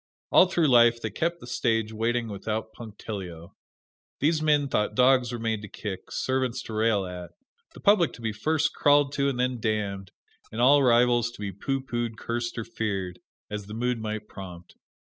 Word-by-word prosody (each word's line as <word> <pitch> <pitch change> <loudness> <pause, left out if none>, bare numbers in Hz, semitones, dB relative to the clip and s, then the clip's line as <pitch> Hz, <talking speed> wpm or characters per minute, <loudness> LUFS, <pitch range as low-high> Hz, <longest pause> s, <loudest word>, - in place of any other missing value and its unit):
All 185 - +7
through 175 -3 +2
life 120 -2 +5
they 110 -2 -4
kept 170 - -2
the - - -9
stage 115 -3 0
waiting 115 +2 0
without 110 +2 -4
punctilio. 100 -7 -8 0.7
These 155 +2 +2
men 150 -2 +3
thought 105 -4 -1
dogs 125 -1 +4
were 120 - -3
made 115 -2 -2
to 105 - -8
kick, 95 -1 -7
servants 130 -2 -1
to 110 - -8
rail 110 -2 +1
at, 90 -1 -7 0.5
the - - -12
public 200 -5 +4
to - - -12
be 110 -1 -2
first 155 +7 0
crawled 145 -1 +3
to 140 0 +1
and 125 -2 -3
then 125 -1 0
damned, 100 -4 -2 0.4
and 110 - -6
all 140 +4 +6
rivals 120 -2 +4
to - - -14
be 100 -1 -3
pooh 135 +8 -3
poohed, 120 -3 -3
cursed 115 +1 -3
or 115 - -2
feared, 95 -5 -3 0.3
as 105 -1 -5
the 105 - -7
mood 125 +1 -1
might 110 -1 -4
prompt. 90 -3 -10
115 Hz, 185 wpm, -26 LUFS, 105-130 Hz, 0.7 s, All